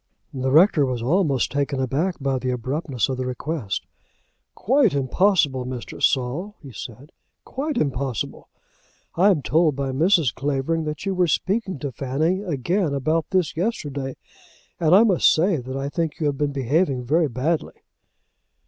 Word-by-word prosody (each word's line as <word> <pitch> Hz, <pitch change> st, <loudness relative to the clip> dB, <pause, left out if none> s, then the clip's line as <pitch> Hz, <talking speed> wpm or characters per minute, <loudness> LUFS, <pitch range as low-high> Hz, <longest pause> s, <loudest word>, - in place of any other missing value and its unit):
The 130 Hz, -1 st, -1 dB
rector 160 Hz, +2 st, +5 dB
was 125 Hz, -3 st, -2 dB
almost 140 Hz, -3 st, +1 dB
taken 140 Hz, 0 st, -1 dB
aback 145 Hz, +8 st, 0 dB
by 135 Hz, -2 st, -1 dB
the 130 Hz, 0 st, -3 dB
abruptness 130 Hz, -, -2 dB
of 130 Hz, -, -3 dB
the 130 Hz, -, -3 dB
request. 125 Hz, -3 st, -3 dB, 0.7 s
"Quite 245 Hz, -, +2 dB
impossible, 140 Hz, -1 st, +2 dB
Mr. 125 Hz, -1 st, -7 dB
Saul," 145 Hz, +11 st, 0 dB
he 135 Hz, -, -10 dB
said 125 Hz, +6 st, -9 dB, 0.3 s
"quite 285 Hz, +1 st, -3 dB
impossible. 135 Hz, -, -2 dB, 0.6 s
I 190 Hz, +5 st, +4 dB
am 165 Hz, -8 st, +2 dB
told 160 Hz, -2 st, +2 dB
by 135 Hz, -1 st, -2 dB
Mrs. 165 Hz, 0 st, +3 dB
Clavering 145 Hz, +4 st, -1 dB
that 150 Hz, +3 st, -5 dB
you 195 Hz, -, 0 dB
were 180 Hz, -1 st, +2 dB
speaking 190 Hz, +3 st, -1 dB
to 140 Hz, 0 st, -5 dB
Fanny 145 Hz, -, -1 dB
again 170 Hz, -1 st, -1 dB
about 155 Hz, +4 st, 0 dB
this 185 Hz, -4 st, 0 dB
yesterday, 145 Hz, -, -3 dB, 0.6 s
and 165 Hz, +1 st, +4 dB
I 210 Hz, -, +7 dB
must 195 Hz, -7 st, +4 dB
say, 175 Hz, +2 st, +2 dB
that 130 Hz, +1 st, -6 dB
I 135 Hz, +1 st, -3 dB
think 160 Hz, 0 st, -3 dB
you 155 Hz, -, -1 dB
have 145 Hz, -2 st, 0 dB
been 145 Hz, -1 st, 0 dB
behaving 140 Hz, 0 st, 0 dB
very 160 Hz, +5 st, +2 dB
badly." 150 Hz, +7 st, -2 dB
145 Hz, 155 wpm, -23 LUFS, 130-175 Hz, 0.7 s, I